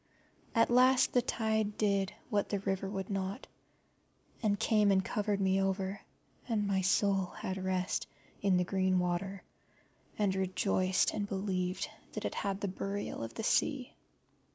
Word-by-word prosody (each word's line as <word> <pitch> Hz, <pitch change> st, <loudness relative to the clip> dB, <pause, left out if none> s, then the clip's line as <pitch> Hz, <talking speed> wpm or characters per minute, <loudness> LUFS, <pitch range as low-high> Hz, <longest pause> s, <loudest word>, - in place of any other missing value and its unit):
At 230 Hz, +1 st, +4 dB
last 255 Hz, +1 st, +5 dB
the 245 Hz, -, +5 dB
tide 220 Hz, -3 st, 0 dB
did 200 Hz, -2 st, +1 dB, 0.2 s
what 205 Hz, -1 st, +1 dB
the 205 Hz, -, 0 dB
river 195 Hz, 0 st, -1 dB
would 195 Hz, 0 st, -4 dB
not, 195 Hz, +5 st, -3 dB, 1.0 s
and 205 Hz, -2 st, +1 dB
came 210 Hz, -2 st, +3 dB
and 190 Hz, -1 st, +3 dB
covered 205 Hz, -1 st, -1 dB
me 190 Hz, 0 st, +2 dB
over, 195 Hz, 0 st, -1 dB, 0.5 s
and 215 Hz, -3 st, +1 dB
my 195 Hz, -1 st, +1 dB
soul 195 Hz, 0 st, +2 dB
had 190 Hz, 0 st, -4 dB
rest 185 Hz, -1 st, -1 dB, 0.3 s
in 195 Hz, -2 st, +3 dB
the 180 Hz, -, +3 dB
green 190 Hz, 0 st, +1 dB
water, 180 Hz, +2 st, -1 dB, 0.7 s
and 205 Hz, -3 st, +2 dB
rejoiced 185 Hz, 0 st, +1 dB
and 205 Hz, -1 st, -2 dB
believed 185 Hz, -2 st, -1 dB, 0.3 s
that -, -, -4 dB
it -, -, -2 dB
had 200 Hz, -1 st, -2 dB
the 200 Hz, -, -1 dB
Burial 195 Hz, -, -4 dB
of 115 Hz, 0 st, -7 dB
the -, -, -4 dB
Sea. -, -, +1 dB
195 Hz, 155 wpm, -32 LUFS, 190-205 Hz, 1.0 s, last